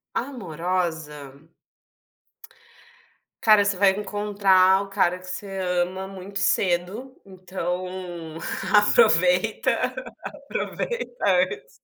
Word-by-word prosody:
Amorosa. 165 Hz, -, -3 dB, 2.1 s
"Cara, 215 Hz, -2 st, +6 dB
você 200 Hz, -1 st, 0 dB
vai 195 Hz, 0 st, +5 dB
encontrar 195 Hz, -2 st, +2 dB
o 200 Hz, -, -11 dB
cara 185 Hz, -2 st, +1 dB
que 185 Hz, -, -14 dB
você 185 Hz, +2 st, -6 dB
ama 180 Hz, +1 st, -1 dB
muito 195 Hz, +1 st, -7 dB
cedo, 200 Hz, +6 st, 0 dB
então 180 Hz, -2 st, -6 dB, 0.4 s
aproveita, 470 Hz, -, +4 dB, 0.7 s
aproveita 485 Hz, 0 st, -4 dB
antes" 445 Hz, +3 st, +1 dB
190 Hz, 80 wpm, -24 LUFS, 180-205 Hz, 2.1 s, Cara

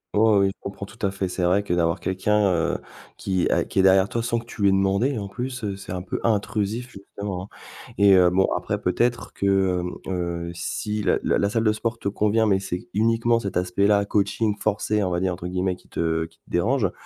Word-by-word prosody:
Oh 110 Hz, 0 st, +5 dB
oui, 95 Hz, -, +3 dB
je -, -, -18 dB
comprends 100 Hz, 0 st, -7 dB
tout 100 Hz, -, -15 dB
à -, -, 0 dB
fait. 95 Hz, -1 st, -3 dB
C'est 90 Hz, 0 st, -4 dB
vrai 95 Hz, +4 st, +3 dB
que 95 Hz, -3 st, -2 dB
d'avoir 85 Hz, -1 st, +1 dB
quelqu'un, 100 Hz, +2 st, +1 dB
heu, 85 Hz, 0 st, 0 dB, 0.4 s
qui 95 Hz, -2 st, 0 dB
a -, -, +2 dB
qui -, -, -2 dB
est -, -, +7 dB
derrière 95 Hz, 0 st, +5 dB
toi 115 Hz, -, -2 dB
sans 120 Hz, 0 st, -1 dB
que 115 Hz, -, -5 dB
tu 120 Hz, -2 st, -9 dB
lui 100 Hz, -, +5 dB
aies -, -, +3 dB
demandé 100 Hz, +7 st, +1 dB
en 100 Hz, -, -4 dB
plus, 125 Hz, +4 st, -5 dB
heu, 100 Hz, -2 st, -2 dB
c'est 95 Hz, -2 st, -9 dB
un 90 Hz, -1 st, -4 dB
peu 90 Hz, -, -4 dB
intrusif 110 Hz, +2 st, 0 dB
justement, 100 Hz, -1 st, -6 dB
hein -, -, -15 dB, 0.5 s
et 100 Hz, -1 st, +6 dB
heu, 90 Hz, -2 st, +6 dB
bon 95 Hz, +2 st, +3 dB
après -, -, -2 dB
peut-être 120 Hz, +7 st, 0 dB
que, 95 Hz, -2 st, +1 dB
hem, 90 Hz, 0 st, -4 dB, 0.2 s
heu, 85 Hz, -1 st, -3 dB
si 105 Hz, +5 st, -3 dB
la -, -, +2 dB
la -, -, +2 dB
la 100 Hz, -, +1 dB
salle 115 Hz, 0 st, 0 dB
de 110 Hz, -, +4 dB
sport 115 Hz, +1 st, -2 dB
te 100 Hz, -, -2 dB
convient, 105 Hz, +2 st, +2 dB
mais 95 Hz, -3 st, +3 dB
c'est 90 Hz, -2 st, -5 dB
uniquement 115 Hz, +2 st, +2 dB
cet 100 Hz, -5 st, -3 dB
aspect-là: 100 Hz, +3 st, +2 dB
«coaching 105 Hz, +1 st, 0 dB
forcé» 105 Hz, +1 st, 0 dB
on 90 Hz, -, 0 dB
va 85 Hz, -, -1 dB
dire 95 Hz, 0 st, 0 dB
entre 90 Hz, 0 st, -6 dB
guillemets, 90 Hz, 0 st, -1 dB
qui -, -, -23 dB
te 80 Hz, -1 st, -1 dB
qui 80 Hz, 0 st, -17 dB
te -, -, -54 dB
dérange, 115 Hz, +7 st, +1 dB
100 Hz, 240 wpm, -24 LUFS, 90-105 Hz, 0.5 s, est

